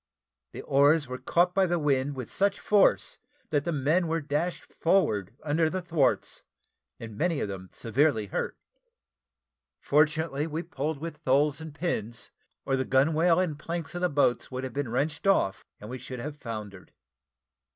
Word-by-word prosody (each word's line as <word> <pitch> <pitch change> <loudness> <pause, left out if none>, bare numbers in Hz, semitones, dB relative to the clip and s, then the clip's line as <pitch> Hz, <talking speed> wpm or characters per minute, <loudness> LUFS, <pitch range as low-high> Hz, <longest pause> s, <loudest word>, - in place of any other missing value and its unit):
The - - -7
oars 145 +2 +4
were 130 0 -6
caught 175 +7 +2
by 190 0 +3
the 175 0 +1
wind 140 -2 +1
with 130 -3 -6
such 200 +1 +1
force, 195 - +3 0.3
that 145 -1 +1
the 170 - 0
men 155 +4 +1
were 165 +1 0
dashed 150 +4 -2
forward 115 - +1
under 155 +2 +2
the 185 - -2
thwarts, 160 -7 0 0.6
many 140 +9 -2
of - - -1
them 95 -2 -7
severely 120 -1 +1
hurt. 100 - -3 1.2
Fortunately 150 0 +1
we 160 +2 -3
pulled 155 -2 -3
with 160 +1 -6
tholes 145 +2 +2
and 160 -1 -7
pins, 120 - -4 0.3
or 135 - +1
the 130 - 0
gunwale 160 +6 +3
and 160 -6 -1
planks 165 0 -4
of 175 - -4
the 180 - +2
boats 140 -4 +1
would 130 0 -5
have 130 -2 -5
been 140 -3 -2
wrenched 145 - -1
off, 110 - +2 0.2
and 105 - -9
we 125 +3 -6
should 125 0 -7
have 145 +4 -5
foundered. 110 -8 -8
145 Hz, 165 wpm, -28 LUFS, 130-165 Hz, 1.2 s, oars